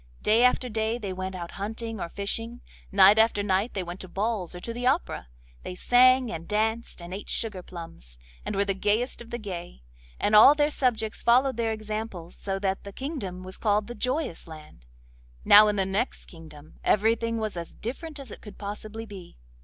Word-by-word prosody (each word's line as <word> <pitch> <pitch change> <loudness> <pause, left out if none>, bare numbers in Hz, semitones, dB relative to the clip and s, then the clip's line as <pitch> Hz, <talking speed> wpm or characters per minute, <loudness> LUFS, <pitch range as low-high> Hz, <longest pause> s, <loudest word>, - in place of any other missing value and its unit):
Day 225 +3 +4
after 250 0 +3
day 220 0 -1
they 200 -5 -5
went 185 0 -5
out 170 -2 -6
hunting 225 +2 -4
or 170 - -4
fishing; 225 +5 -4 0.3
night 200 +2 +7
after 220 -2 +3
night 200 +3 0
they 190 - -1
went 175 +1 -7
to 185 - -7
balls 195 -2 -2
or - - -6
to 230 +6 -6
the 245 +1 -2
opera; 255 - 0 0.3
they 180 - -7
sang, 255 +3 +5
and 165 0 -6
danced, 220 -2 -1
and 175 +1 -8
ate 200 - -7
sugar 210 -5 -3
plums, 165 - -11 0.3
and - - -4
were 200 +1 +2
the 200 - 0
gayest 210 +6 0
of 235 - -11
the 240 - -3
gay, 175 - -7 0.4
and 210 - +2
all 225 +7 +9
their 295 0 +2
subjects 225 -6 -1
followed 255 +3 +4
their 230 -1 0
example 215 -5 -5
so 195 -1 -4
that 195 -1 -2
the 200 - -8
kingdom 200 - -5
was 185 0 -8
called 210 -1 +2
the 240 - -7
Joyous 255 - -2
Land. 155 - -13 0.6
Now 210 +1 +9
in 210 - +1
the 195 -1 +1
next 195 +6 -2
kingdom 155 -2 -14
everything 230 +2 +2
was 215 -3 -3
as 170 -1 -6
different 295 +6 -6
as 275 - -9
it - - -10
could 210 - -12
possibly 215 +2 -6
be. 195 - -11
210 Hz, 200 wpm, -27 LUFS, 185-230 Hz, 0.6 s, all